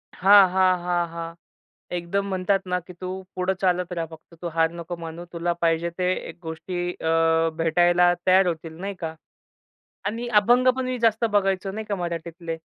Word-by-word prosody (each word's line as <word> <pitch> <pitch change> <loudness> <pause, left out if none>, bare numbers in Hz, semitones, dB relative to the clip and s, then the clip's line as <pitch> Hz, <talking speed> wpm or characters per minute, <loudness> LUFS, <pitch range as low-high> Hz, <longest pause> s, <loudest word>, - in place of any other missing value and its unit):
हां, 195 +1 +7
हां, 185 -1 +3
हां, 175 -1 0
हां. 165 0 -6 0.6
एकदम 195 +4 -2
म्हणतात 190 +1 +1
ना, 180 0 0
की 180 +1 -13
तू 185 - -4 0.3
पुढं 185 +1 0
चालत 180 -1 +1
रहा. 165 -1 -2
फक्त 160 +1 -14
तू 175 - -3
हार 165 0 +3
नको 170 +1 -6
मानू. 165 +2 -7
तुला 170 +1 -1
पाहिजे 165 0 +2
ते 180 0 +1 0.2
एक - - -10
गोष्टी 175 +2 -4
अ 165 0 +3
भेटायला 175 +2 +4
तयार 185 0 +5
होतील 165 -1 -3
नाही 200 +1 -3
का? 160 -2 -4 0.9
आणि 230 +4 -3
अभंग 245 +4 +4
पण 260 -1 -2
मी 255 0 -2
जास्त 225 +1 +3
बघायचो 195 -1 +1
नाही 215 +2 -5
का 205 - -2
मराठीतले. 170 -1 -5
175 Hz, 175 wpm, -24 LUFS, 165-190 Hz, 0.9 s, हां